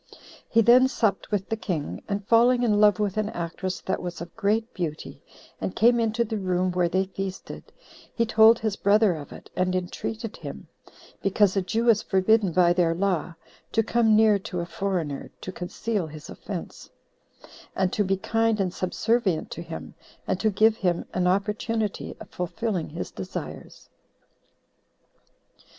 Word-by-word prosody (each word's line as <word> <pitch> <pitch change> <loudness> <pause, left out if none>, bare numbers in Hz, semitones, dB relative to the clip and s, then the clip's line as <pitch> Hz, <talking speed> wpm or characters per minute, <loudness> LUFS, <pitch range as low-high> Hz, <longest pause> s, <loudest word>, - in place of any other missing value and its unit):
He 230 - +4
then 245 +3 +6
supped 220 -7 -1
with 205 -3 -2
the 225 - 0
king, 175 -9 -4
and 200 0 -3
falling 240 +2 +4
in 210 -3 +3
love 210 -3 +6
with 205 -1 -1
an 215 0 0
actress 175 +1 -4
that 190 - -2
was 175 0 -5
of 170 0 -9
great 225 +2 0
beauty, 160 -4 -5 0.4
and 190 - -3
came 240 +2 +4
into 225 +1 +1
the 220 -1 -3
room 185 -1 0
where 180 -1 +1
they 185 +2 +1
feasted, 190 0 -7 0.4
he 230 - 0
told 225 0 +6
his 220 -3 -2
brother 205 -1 +3
of 150 -3 -8
it, - - -12
and 185 0 0
entreated 215 +5 -4
him, - - -8 0.5
because 195 0 +2
a 195 - +2
Jew 225 +6 -1
is 220 -2 +5
forbidden 195 0 +2
by 175 0 +4
their 170 -2 +2
law 180 -2 -1 0.4
to 225 - +3
come 225 -1 +3
near 215 -2 +5
to 180 -1 -5
a 170 - -2
foreigner, 175 -6 -3
to 185 - -6
conceal 185 +2 -3
his 155 0 -10
offense; - - -7 0.9
and 190 -1 0
to 210 - +2
be 195 0 0
kind 225 +2 +1
and 185 -2 0
subservient 190 -1 0
to - - -6
him, 80 - -8 0.3
and 185 - -1
to 220 - +2
give 215 +2 +3
him 175 -3 0
an 180 -1 +1
opportunity 210 +2 -1
of - - -10
fulfilling 180 +1 -3
his 165 +3 -6
desires. 95 -1 -8
195 Hz, 165 wpm, -25 LUFS, 180-220 Hz, 0.9 s, then